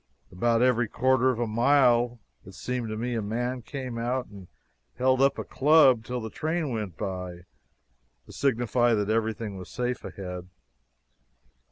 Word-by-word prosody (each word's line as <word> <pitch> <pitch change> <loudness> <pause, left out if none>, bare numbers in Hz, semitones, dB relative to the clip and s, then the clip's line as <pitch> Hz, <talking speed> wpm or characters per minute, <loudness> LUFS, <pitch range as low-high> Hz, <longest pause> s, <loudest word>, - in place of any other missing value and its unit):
About 115 +5 +2
every 120 -2 +3
quarter 130 +2 +2
of 125 - 0
a 120 - 0
mile, 120 +1 +3 0.3
it - - -13
seemed 125 -3 -3
to 110 - -4
me, 120 +2 -2
a 115 - -1
man 120 +4 -2
came 130 -2 -6
out 125 +2 -1
and 100 -3 -13 0.5
held 130 +1 +2
up 140 0 +3
a - - -3
club 135 -5 +4
till 125 +2 -4
the 110 -2 -6
train 160 -2 -2
went 105 -7 -4
by, 90 -3 -5 0.8
to - - -14
signify 120 -2 +2
that 105 0 0
everything 110 -2 -2
was 90 - -9
safe 125 0 -3
ahead. 90 -2 -7
120 Hz, 160 wpm, -27 LUFS, 110-125 Hz, 0.8 s, club